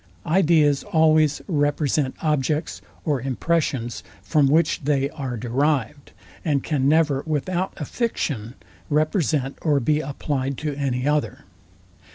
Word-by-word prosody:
Ideas 155 -4 +3
always 155 -5 +3
represent 145 -4 0
the - - -9
Objects 150 +1 0 0.2
or 145 -5 0
impressions, 135 -2 -1 0.2
from 150 -4 +3
which 160 +4 +2
they 140 0 +1
are 130 -5 -5
derived, 140 +3 -1 0.3
and 145 -5 0
can 140 -3 +1
never 150 -3 +3
without 175 +5 -1
a 150 - -4
fiction 135 - -3 0.3
represent 150 -3 0
or 150 -3 +2
be 150 +4 +1
applied 140 -2 -3
to 150 -1 -3
any 135 -2 -2
other. 150 0 -1
145 Hz, 125 wpm, -23 LUFS, 135-155 Hz, 0.3 s, Ideas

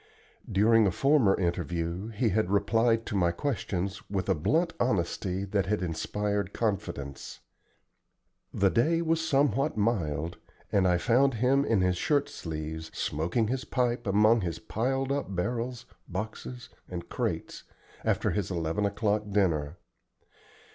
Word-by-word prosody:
During 110 +2 +5
a - - +2
former 135 - +3
interview 85 +1 -2
he 115 +1 0
had 105 -1 +1
replied 115 +3 +2
to 105 - -4
my 90 -3 +3
questions 95 -3 -2
with 95 -1 -2
a - - +5
blunt 160 - +1
honesty 95 -3 0
that 100 -1 0
had 105 -1 0
inspired 100 +3 -2
confidence. 85 - -3 1.1
The 95 -1 +2
day 165 +8 +2
was 165 0 +1
somewhat 140 -4 +1
mild, 85 -8 -1 0.3
and 95 -2 +3
I 90 -1 +3
found 125 +6 +3
him 130 +4 +3
in 115 -8 +2
his 90 -1 +2
shirt 145 - +1
sleeves, 80 0 -5
smoking 85 +9 0
his 130 +1 -1
pipe 120 -2 -1
among 105 +3 +4
his 85 -3 -3
piled 135 +5 -1
up 140 -9 -2
barrels, 120 +6 -2 0.2
boxes, 110 +6 -6 0.2
and 85 -1 -6
crates, - - -3 0.4
after - - +1
his 105 -4 -1
eleven 85 +3 0
o'clock 105 0 -1
dinner. 85 -6 +1
105 Hz, 135 wpm, -29 LUFS, 90-120 Hz, 1.1 s, During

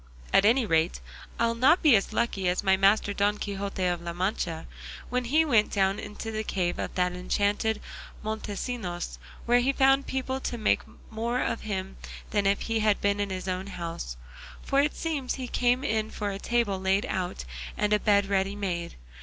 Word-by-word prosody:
At 195 - +6
any 235 +3 +4
rate 165 -2 +1 0.4
I'll 230 0 +2
not 260 +10 +4
be 295 -7 +7
as 195 - +1
lucky 215 -4 0
as 180 - 0
my 190 -1 +4
master 200 +2 +3
Don 205 +1 +1
Quixote 200 -2 -3
of 175 -1 0
La 170 0 -5
Mancha, 175 -2 -2 0.5
when 250 0 0
he 310 +6 +3
went 230 -8 +3
down 195 0 +1
into 225 +2 -6
the 215 0 -2
cave 180 -4 -1
of - - -4
that 180 -1 +2
enchanted 205 +4 0 0.4
Montesinos, 215 -3 -4 0.3
where 240 +1 +4
he 255 +3 +2
found 270 0 +3
people 265 0 -2
to 245 - -3
make 215 - +2 0.3
more 230 +3 -1
of 230 - -1
him 195 -2 -4 0.3
than 205 -2 +2
if 200 0 +2
he 225 -1 -1
had 215 -1 +2
been 200 0 +1
in 205 0 -1
his 185 0 -4
own 185 +1 -2
house; 165 - -5 0.5
for 275 0 +3
it 290 +1 0
seems 295 -6 -2
he 260 -2 -5
came 245 +2 +1
in 220 -5 0
for 205 -2 -3
a 195 - -5
table 230 -5 0
laid 190 +4 +1
out 180 - -3 0.3
and 210 0 +1
a 210 - +4
bed 200 -2 +3
ready 195 0 0
made. 180 -4 -3
205 Hz, 190 wpm, -27 LUFS, 190-235 Hz, 0.5 s, be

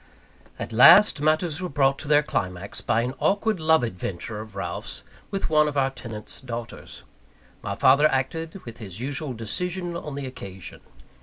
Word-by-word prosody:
At - - -6
last, 145 - +8
matters 155 +2 +1
were 180 - -3
brought 135 -2 +2
to 155 - -7
their 150 0 +5
climax 95 -7 -3
by 115 - +1
an 125 +2 -2
awkward 205 0 +1
love 160 -2 +4
adventure 105 0 -4
of 110 -2 -12
Ralph's 90 -3 -4 0.3
with 195 -1 -2
one 150 -1 +4
of 145 -1 -3
our 135 -1 +2
tenants' 115 -4 -8
daughters. 120 -3 -8 0.6
My 100 - -4
father 140 +7 +5
acted 160 +7 -3
with 115 0 -9
his 100 -4 -7
usual 135 +2 -4
decision 175 - -3
on 150 -4 -6
the 140 -1 -4
occasion. 95 -8 -9
135 Hz, 165 wpm, -25 LUFS, 115-160 Hz, 0.6 s, last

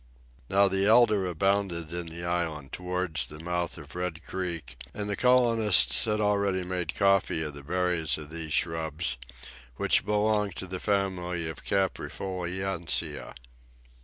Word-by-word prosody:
Now, 100 +1 +5
the 95 +1 +1
elder 110 -4 +5
abounded 90 -2 0
in 85 -1 -4
the 85 +1 -8
island 85 -5 -2
towards 90 -7 -1
the 75 - -11
mouth 85 +1 -3
of - - -11
Red 90 -2 -4
Creek, 85 -8 -5 0.2
and 105 -1 -4
the 100 - -1
colonists 115 -5 +5
had 105 -1 0
already 100 -3 +1
made 90 -2 -3
coffee 100 -5 +2
of 75 -2 -5
the 70 - -10
berries 90 +1 0
of 75 -1 -9
these 80 -1 -6
shrubs, 80 -4 +1 0.6
which - - +3
belong 105 -1 +1
to 95 - -5
the 95 0 -6
family 90 -4 -1
of 80 - -6
the - - -11
caprifoliaceae. 95 -2 -2
90 Hz, 145 wpm, -28 LUFS, 85-100 Hz, 0.6 s, Now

